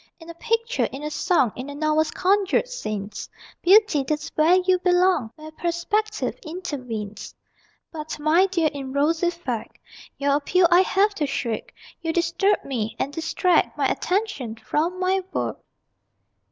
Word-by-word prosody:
In 330 0 -10
a - - -10
picture, 460 +6 0
in 275 +2 -7
a 300 - -3
song, 290 - +2
In 255 +3 -6
a 285 - -7
novel's 310 +1 +1
conjured 395 +5 +1
scenes, 215 - -5 0.3
Beauty, 385 -6 +5
that's 300 +3 -3
where 320 +4 +4
you 370 0 +3
belong, 355 -8 +2
Where 310 0 -11
perspective 355 +7 -2
intervenes. 250 - -6 0.6
But, 310 -1 -6
my 320 +6 +4
dear, 335 -5 +1
in 270 -2 -6
rosy 320 +5 +2
fact 270 -10 -5 0.4
Your 280 0 +2
appeal 350 +5 +2
I 350 - +7
have 400 +2 +2
to 310 -7 -2
shirk 235 -5 -3 0.3
You 325 -1 -2
disturb 345 +4 +1
me, 230 -5 -3
and 280 - -2
distract 325 +3 +1
My - - +2
attention 360 - -2
from 330 +10 -2
my 375 +1 +1
work! - - -2
325 Hz, 150 wpm, -24 LUFS, 285-370 Hz, 0.6 s, I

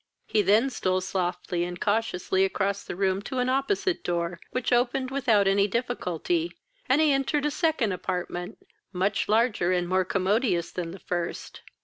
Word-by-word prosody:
He 215 - +2
then 215 +7 +3
stole 185 -5 0
softly 180 -2 -2
and 175 0 -5
cautiously 200 -3 +1
across 195 +1 0
the - - -6
room 190 0 +1
to 260 +5 -5
an 250 0 +1
opposite 330 +8 0
door, 170 0 -2
which 255 0 -1
opened 255 +2 +1
without 235 -8 +3
any 200 +1 +3
difficulty, 245 - -1 0.4
and - - +4
he 310 -2 +4
entered 275 +2 +1
a 300 - +1
second 305 - +1
apartment, 180 -1 -4 0.3
much 195 +2 0
larger 215 -5 +2
and 180 -1 +1
more 185 +1 +2
commodious 190 0 0
than 175 -2 -4
the 180 - -8
first. 175 -2 -4
200 Hz, 160 wpm, -27 LUFS, 180-255 Hz, 0.4 s, and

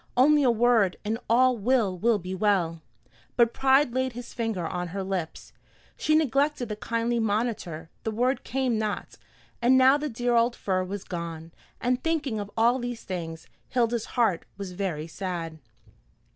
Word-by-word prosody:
only 295 +4 +6
a 260 - +4
word, 230 -4 +3
and 220 +2 -1
all 255 +2 +5
will 225 -2 +2
be 185 -1 -6
well." 185 -5 +1 0.5
But 235 -1 +4
pride 265 -1 +3
laid 260 0 0
his 245 +1 -8
finger 225 -7 -2
on 180 +1 -3
her 195 +3 -4
lips. 185 -4 -4 0.4
She 310 - +1
neglected 285 -3 +1
the 210 - -3
kindly 230 +2 -1
monitor, 205 -7 -2
the - - -2
word 245 +5 0
came 255 -4 0
not, 215 -1 -3 0.4
and 250 +2 +5
now 260 +2 +6
the 300 0 -3
dear 240 0 -1
old 235 +1 +3
fir 185 -2 -1
was 195 +1 -5
gone; 170 -2 -6 0.3
and 250 +1 0
thinking 295 -9 -1
of 205 -1 -5
all 235 +3 +4
these 245 -1 -5
things, 165 -3 -5 0.2
Hilda's 235 -2 +1
heart 220 -8 +2
was 200 -2 -6
very 180 -5 -3
sad. 165 -2 -5
225 Hz, 160 wpm, -26 LUFS, 185-245 Hz, 0.5 s, only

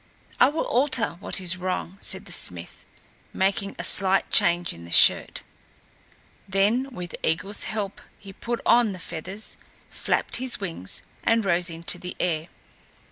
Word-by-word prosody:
"I 255 - +6
will 310 +3 -2
alter 250 -2 +2
what - - -1
is 185 0 -1
wrong," 185 +1 -4
said 190 +1 -2
the 190 - -11
smith, 90 - 0 0.5
making 195 +1 -1
a - - -5
slight 195 0 +3
change 175 0 +4
in 85 - -12
the 85 - -11
shirt. - - +5 1.0
Then 205 +7 +1
with 180 -9 -8
Eigil's 195 +6 -1
help 205 -2 -4 0.2
he 195 -1 -13
put 235 +4 -4
on 235 -4 +4
the - - -8
feathers, 180 +4 -8 0.3
flapped - - -1
his 255 -1 -1
wings 165 - -2 0.2
and 230 -2 +2
rose 175 -1 +1
into 165 +2 -2
the 180 0 -8
air. 165 -2 -1
190 Hz, 150 wpm, -24 LUFS, 175-215 Hz, 1.0 s, I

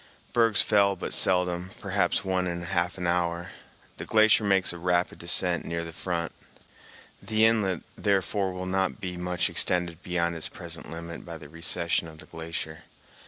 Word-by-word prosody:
Bergs 115 -3 +4
fell 100 -2 +3
but - - -5
seldom, 90 -1 +2
perhaps - - 0
one 95 -1 0
in 85 0 -3
half 90 0 -1
an 90 - -4
hour. 85 0 0 0.5
The - - -6
glacier 110 +1 +5
makes 95 -3 +2
a 85 - -8
rapid 90 0 0
descent 85 0 +3
near 85 0 -3
the 85 - -8
front. 85 -1 -3 0.9
The 110 0 +3
inlet, 105 -6 +2
therefore, 100 -1 0
will 90 0 -5
not 95 0 0
be 90 -2 -5
much 90 0 0
extended 85 -2 +1
beyond 85 -1 -1
its 80 - -2
present - - -7
limit 85 +1 -7
by 85 -1 -8
the 75 -2 -12
recession 85 +1 +1
of 80 -1 -12
the - - -11
glacier. 80 -1 -6
90 Hz, 165 wpm, -27 LUFS, 85-95 Hz, 0.9 s, glacier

